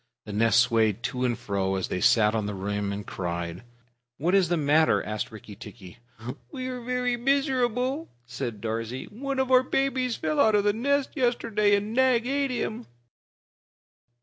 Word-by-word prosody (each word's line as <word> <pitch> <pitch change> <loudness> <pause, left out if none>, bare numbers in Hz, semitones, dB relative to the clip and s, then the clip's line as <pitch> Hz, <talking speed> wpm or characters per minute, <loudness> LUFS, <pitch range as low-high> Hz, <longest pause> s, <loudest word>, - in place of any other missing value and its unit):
The 105 - -7
nest 115 +2 +4
swayed 115 -2 +1
to 125 -1 -1
and 120 -3 0
fro, 95 -1 -1
as 95 - -2
they 90 - -2
sat 115 -3 +4
on 110 -2 -1
the 105 - -4
rim 100 +1 -2
and 100 +1 -5
cried. 85 -1 -4 0.6
"What 170 +6 0
is 190 -4 +4
the 175 - +1
matter?" 155 +1 +3
asked 105 0 -4
Rikki 110 -1 -11
tikki. 95 0 -12 0.5
"We 255 -3 -5
are 250 -1 -5
very 250 0 -1
miserable," 265 +2 0 0.2
said 120 -3 -5
Darzee. 115 +3 -3
"One 275 +5 -4
of 265 0 0
our 255 -1 +7
babies 260 -2 0
fell 305 - -2
out 220 -6 +5
of 205 - +3
the 205 0 +2
nest 280 +5 0
yesterday 230 -5 +2
and 205 +2 -2
Nag 255 -2 +3
ate 275 +1 0
him." 240 -2 -3
195 Hz, 175 wpm, -26 LUFS, -, 0.6 s, our